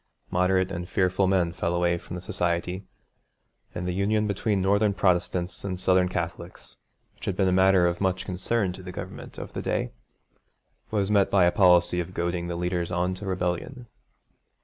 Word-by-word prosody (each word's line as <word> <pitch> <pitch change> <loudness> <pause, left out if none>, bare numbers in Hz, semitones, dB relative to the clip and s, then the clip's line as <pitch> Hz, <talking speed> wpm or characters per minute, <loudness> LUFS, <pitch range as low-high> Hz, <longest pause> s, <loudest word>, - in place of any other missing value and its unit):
Moderate 95 +1 +2
and 85 -1 -5
fearful 95 +1 +2
men 90 -3 +2
fell 85 0 -2
away 85 0 +2
from 85 - -8
the 90 - -7
Society, 90 +2 -2 0.9
and 90 0 -3
the 90 - -1
union 105 +3 +1
between 100 0 0
Northern 100 +2 +2
Protestants 90 -1 0
and 95 -2 -3
Southern 95 -1 +3
Catholics, 85 0 -6 0.4
which - - -11
had 95 - -1
been 95 0 +2
a - - +3
matter 95 -1 +5
of 85 +1 0
much 95 -1 0
concern 95 +1 -1
to 95 - -10
the 90 0 -8
Government - - -8
of - - -8
the - - -3
day, - - -1 1.0
was 105 -2 0
met 100 -2 +4
by 95 -3 +4
a 85 - +4
policy 90 -2 +4
of 90 +1 -5
goading 85 0 -2
the 85 - -3
leaders 90 0 -2
on 90 +1 0
to 95 +2 -7
rebellion. 90 +7 -3
90 Hz, 180 wpm, -26 LUFS, 90-95 Hz, 1.0 s, matter